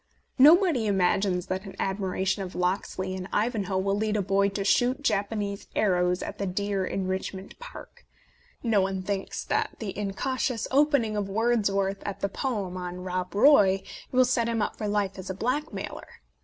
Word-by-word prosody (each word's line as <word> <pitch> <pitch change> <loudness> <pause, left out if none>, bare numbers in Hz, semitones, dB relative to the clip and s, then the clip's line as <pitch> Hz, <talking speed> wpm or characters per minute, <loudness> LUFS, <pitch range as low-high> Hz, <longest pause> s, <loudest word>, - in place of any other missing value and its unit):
Nobody 305 - +6
imagines 185 -1 +1
that 185 0 -3
an 195 - -9
admiration 190 0 -1
of 185 -1 -6
Locksley 185 +1 -1
in 185 0 -5
" - - -27
Ivanhoe" 210 -4 0
will 195 +1 +1
lead 215 +1 0
a 205 - 0
boy 200 +1 +2
to 195 0 -3
shoot 250 +7 +2
Jap 205 -5 +1
anese 205 -2 -4
arrows 180 -3 +2
at - - -7
the 200 - -1
deer 200 +1 -1
in 190 +1 -2
Richmond 190 +1 -4
Park; - - -12 0.6
no 220 -5 +3
one 190 0 -2
thinks 195 0 -3
that - - -1
the 210 -4 -5
incautious 225 +4 -2
opening 275 -6 +3
of 205 -1 -2
Wordsworth 200 -3 +1
at 200 - -6
the 200 - 0
poem 200 -6 -3
on 180 0 -5
Rob 180 0 -3
Roy 205 -6 +5 0.3
will 255 0 +5
set 240 -2 +1
him 230 -1 0
up 210 - -1
for 215 - -4
life 200 -2 -1
as 185 - -7
a 190 - -3
blackmailer. 255 +9 -3
200 Hz, 180 wpm, -27 LUFS, 190-225 Hz, 0.6 s, Nobody